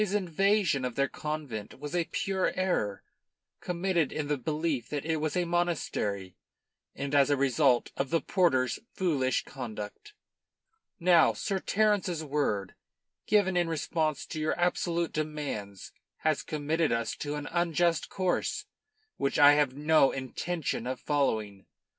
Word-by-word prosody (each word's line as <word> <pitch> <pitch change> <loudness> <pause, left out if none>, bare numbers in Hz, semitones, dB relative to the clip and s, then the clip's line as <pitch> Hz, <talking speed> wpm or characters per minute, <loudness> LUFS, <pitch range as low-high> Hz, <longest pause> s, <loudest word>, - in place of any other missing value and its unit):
His 205 -1 0
invasion 195 -4 +2
of 125 -2 -3
their 140 0 +2
convent 145 -9 -5
was 145 +4 -5
a 175 -1 +1
pure 190 +2 -1
error, 145 - -1 0.6
committed 175 -3 0
in 150 -2 -3
the 145 - +2
belief 150 -2 -2
that 145 -1 -3
it 160 0 0
was 155 +2 -1
a 180 - +1
monastery 150 - -1 0.6
and 140 0 -4
as 140 -1 +5
a 145 - +3
result 135 -2 +3
of 135 -1 -2
the 165 - +2
porter's 130 -12 +1 0.2
foolish 140 -9 +1
conduct. 120 - -7 0.9
"Now, 170 -2 +5
Sir 195 -2 -2
Terence's 200 -5 +1
word, 135 -10 -1 0.5
given 200 -3 +3
in 175 -1 +2
response 155 -1 -1
to 155 - -6
your 155 +2 -1
absolute 170 -1 0
demands, 145 -11 -4 0.3
has 155 -2 +1
committed 155 +1 -1
us 115 0 -1
to 145 0 -3
an 150 0 -5
unjust 170 -1 +1
course, 185 -2 -1 0.5
which 140 - 0
I 145 0 +9
have 145 -3 +2
no 150 -2 +4
intention 135 +1 -3
of 130 0 -3
following. 110 -9 -1
155 Hz, 140 wpm, -29 LUFS, 135-175 Hz, 0.9 s, I